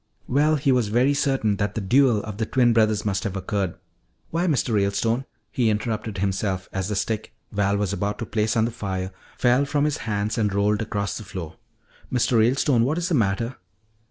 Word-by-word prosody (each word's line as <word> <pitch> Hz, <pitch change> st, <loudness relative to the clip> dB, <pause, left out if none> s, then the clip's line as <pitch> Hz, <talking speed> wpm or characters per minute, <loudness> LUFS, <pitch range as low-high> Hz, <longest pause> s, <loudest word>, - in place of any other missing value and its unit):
"Well, 150 Hz, +4 st, +3 dB
he 140 Hz, -2 st, +1 dB
was 125 Hz, -4 st, +2 dB
very 125 Hz, +6 st, +3 dB
certain 135 Hz, -8 st, +1 dB
that 100 Hz, 0 st, -2 dB
the -, -, 0 dB
duel 120 Hz, +1 st, +3 dB
of 105 Hz, -2 st, -6 dB
the 110 Hz, -, 0 dB
twin 120 Hz, -3 st, +3 dB
brothers 110 Hz, -2 st, +2 dB
must 95 Hz, -1 st, 0 dB
have 100 Hz, -3 st, -3 dB
occurred 95 Hz, -1 st, -2 dB, 0.6 s
Why, 170 Hz, +3 st, 0 dB
Mr. 135 Hz, -7 st, +1 dB
Ralestone," 105 Hz, +5 st, +1 dB, 0.3 s
he 120 Hz, -3 st, +2 dB
interrupted 110 Hz, -1 st, -2 dB
himself 95 Hz, -1 st, -1 dB
as 95 Hz, -1 st, -2 dB
the 105 Hz, -, -2 dB
stick 110 Hz, +2 st, -2 dB, 0.2 s
Val 100 Hz, -1 st, +1 dB
was 100 Hz, -1 st, -1 dB
about 105 Hz, +1 st, -2 dB
to 115 Hz, -, -4 dB
place 110 Hz, +1 st, 0 dB
on 110 Hz, -, +3 dB
the 120 Hz, -, -2 dB
fire 95 Hz, -4 st, -4 dB, 0.3 s
fell 125 Hz, +2 st, +3 dB
from 145 Hz, +1 st, 0 dB
his 150 Hz, 0 st, 0 dB
hands 105 Hz, +2 st, -1 dB
and 105 Hz, -2 st, +1 dB
rolled 105 Hz, +2 st, +2 dB
across 100 Hz, -2 st, -2 dB
the -, -, -8 dB
floor. 90 Hz, -4 st, -7 dB, 0.6 s
"Mr. 125 Hz, -1 st, +2 dB
Ralestone, 120 Hz, +1 st, +3 dB
what 145 Hz, +7 st, 0 dB
is 175 Hz, +1 st, -1 dB
the -, -, 0 dB
matter?" 115 Hz, 0 st, 0 dB
110 Hz, 200 wpm, -24 LUFS, 100-125 Hz, 0.6 s, Well